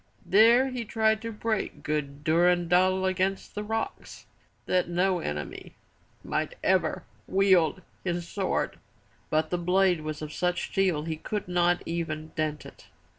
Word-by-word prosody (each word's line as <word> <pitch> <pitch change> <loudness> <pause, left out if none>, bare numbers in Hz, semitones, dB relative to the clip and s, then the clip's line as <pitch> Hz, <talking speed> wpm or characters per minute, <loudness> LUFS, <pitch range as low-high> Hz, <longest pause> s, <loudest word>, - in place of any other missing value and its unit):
There 230 +6 +5
he 250 -2 -4
tried 220 0 +1
to 230 0 -4
break 215 -1 -3
good 145 -1 -3
Durendal 180 +3 +3
against 190 +1 -1
the 210 - -4
rocks 225 +1 -4 0.4
that 180 -1 +1
no 180 +1 +1
enemy 75 - -5 0.5
might - - -2
ever - - +1 0.2
wield 185 -3 +3 0.2
his 175 -2 -2
sword. 190 +1 -2 0.5
But 155 0 +1
the 180 - 0
blade 180 -1 +2
was 155 0 -5
of 150 - -6
such 180 0 -1
steel 185 -6 +1
he 160 -1 -3
could 210 +5 -4
not 175 0 +2
even 160 -2 -3
dent 155 -1 -2
it. - - -14
180 Hz, 140 wpm, -27 LUFS, 160-195 Hz, 0.5 s, There